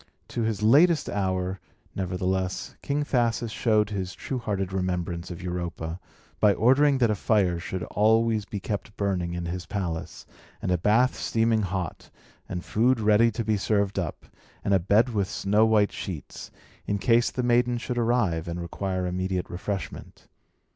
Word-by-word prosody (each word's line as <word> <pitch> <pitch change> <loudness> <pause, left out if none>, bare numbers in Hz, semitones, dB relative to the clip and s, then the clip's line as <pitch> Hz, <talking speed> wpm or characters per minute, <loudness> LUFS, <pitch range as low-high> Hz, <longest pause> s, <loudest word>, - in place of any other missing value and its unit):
To 120 - -3
his 110 -2 -1
latest 150 +7 +5
hour, 95 -1 -1 0.3
nevertheless, 95 0 -2
King 145 +1 -1
Thasus 120 -4 0
showed 110 -2 +2
his 95 -2 -3
true 130 - -4
hearted 95 -4 -2
remembrance 90 -2 -2
of 90 0 -7
Europa, 85 -1 -4 0.4
by 105 -2 +5
ordering 135 +5 +4
that 120 -4 +3
a - - +1
fire 95 -4 +1
should 90 0 -4
always 110 0 +2
be 100 - -5
kept 105 +1 -5
burning 90 -4 -1
in 85 0 -4
his 85 +1 -5
palace, 85 -5 -4 0.3
and - - -2
a 90 - +3
bath 115 +8 +3
steaming 115 -1 +1
hot, 95 -3 -4 0.4
and 90 - -4
food 120 +3 +2
ready 110 +2 +4
to 115 0 -3
be 110 -1 +1
served 100 -1 0
up, 85 -5 -5 0.4
and 100 - +2
a 95 - +5
bed 105 +7 +3
with 100 -5 -1
snow 105 +3 +2
white 105 -2 +3
sheets, 90 -7 -7 0.4
in 100 - 0
case 115 +4 +3
the 125 - -3
maiden 120 0 +2
should 120 0 -3
arrive, 110 -9 +1
and 85 +1 -4
require 95 +2 -3
immediate 90 0 -2
refreshment. 95 0 -6
100 Hz, 160 wpm, -26 LUFS, 90-115 Hz, 0.4 s, latest